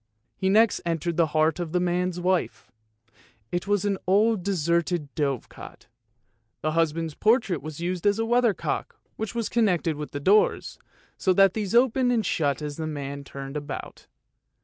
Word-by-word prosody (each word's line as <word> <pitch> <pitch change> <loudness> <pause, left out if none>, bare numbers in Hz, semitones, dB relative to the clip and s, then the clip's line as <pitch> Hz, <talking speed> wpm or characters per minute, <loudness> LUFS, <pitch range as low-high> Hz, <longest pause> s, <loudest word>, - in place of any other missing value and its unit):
He 190 - 0
next 220 +2 +4
entered 170 0 -2
the 165 -1 +3
heart 155 +2 +1
of 170 -2 -4
the 180 - +2
man's 180 0 -1
wife. 180 0 -1 0.8
It 175 +2 -2
was 205 -1 +1
an 200 -2 0
old 210 +2 +3
deserted 170 -4 -1
dove 140 -5 -1
cot; - - -12 0.8
the 155 - 0
husband's 165 0 0
portrait 215 - +2
was 155 +1 -8
used 180 +2 -2
as 205 0 +3
a 225 - 0
weather 240 -2 +3
cock, - - -4 0.2
which 220 +1 -5
was 230 -2 -1
connected 180 -9 +1
with 150 0 -5
the 145 - -5
doors, 200 +9 +2 0.4
so 185 - +2
that 195 0 +5
these 210 -1 -2
opened 250 +1 +3
and 225 -4 +1
shut 145 -4 0
as 145 -1 -5
the 160 -1 -3
man 140 -2 -5
turned 135 +1 -8
about. 145 -1 -7
175 Hz, 170 wpm, -25 LUFS, 155-205 Hz, 0.8 s, that